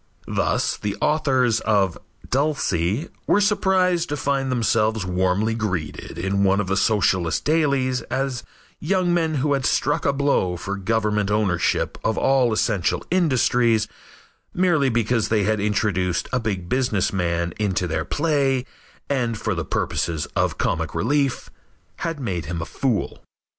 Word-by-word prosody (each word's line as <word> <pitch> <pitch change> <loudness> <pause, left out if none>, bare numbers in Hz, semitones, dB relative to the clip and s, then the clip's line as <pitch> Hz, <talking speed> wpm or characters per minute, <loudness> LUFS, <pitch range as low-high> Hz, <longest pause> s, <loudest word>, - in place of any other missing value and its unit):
Thus, - - 0
the 105 -1 -4
authors 130 -7 +2
of 100 -5 +1 0.3
"Dulcy" 130 - 0 0.2
were - - +4
surprised 190 -4 +2
to 150 - -2
find 135 -2 -1
themselves 110 -3 +1
warmly 95 +4 +1
greeted 90 -9 -4
in 95 +3 0
one 100 0 +3
of 105 - 0
the 95 +1 -1
Socialist 95 -5 +1
dailies 140 -5 +1
as 130 -1 -2 0.4
young 180 +1 +1
men 165 -2 +1
who 145 +1 +1
had 135 -1 0
struck 145 +4 +1
a - - +4
blow 140 -11 +1
for 100 +3 -4
government 105 0 0
ownership 105 -5 0
of 110 - 0
all 130 -3 +3
essential 105 -4 0
industries 125 - +2 0.7
merely 175 -7 +3
because 115 -1 +1
they 110 -2 +2
had 110 +1 +1
introduced 100 -4 0
a 125 - +2
big 100 -6 -3
business 115 -4 0
man 85 -2 -1
into 95 -3 0
their 80 -2 -2
play 140 -5 0 0.4
and, 120 -5 -1
for 110 0 -2
the 85 -2 -2
purposes 80 -4 -1
of - - 0
comic - - -1
relief, 140 +2 0 0.5
had 165 -2 -3
made 90 - -3
him 85 +2 -4
a 85 - -3
fool. 125 0 -2
115 Hz, 145 wpm, -22 LUFS, 95-140 Hz, 0.7 s, were